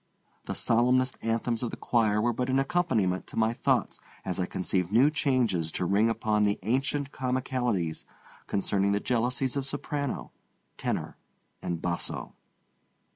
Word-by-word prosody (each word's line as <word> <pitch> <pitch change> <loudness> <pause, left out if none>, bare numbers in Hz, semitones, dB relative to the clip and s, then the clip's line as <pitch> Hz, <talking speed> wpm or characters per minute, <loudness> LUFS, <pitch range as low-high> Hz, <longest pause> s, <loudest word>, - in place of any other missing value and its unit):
The - - -3
solemnest 125 +2 +3
anthems 115 0 0
of 120 - -1
the - - -7
choir 110 -3 +2
were 120 +2 +2
but 125 +3 -2
an 130 - +3
accompaniment 135 - +1
to - - -9
my 110 +1 +3
thoughts - - +1 0.3
as 95 0 -2
I 90 - 0
conceived 90 0 -1
new 130 +7 +5
changes 120 - +1
to 90 - -1
ring 100 +5 +3
upon 110 -2 +1
the 100 0 +2
ancient 135 +5 0
comicalities 125 - -1 0.4
concerning 100 0 +1
the 100 - +2
jealousies 125 +3 0
of 140 -1 -2
soprano, 145 -1 -3 0.4
tenor, - - -3 0.4
and 85 -1 -2
basso. 85 -1 -3
115 Hz, 145 wpm, -28 LUFS, 100-130 Hz, 0.4 s, new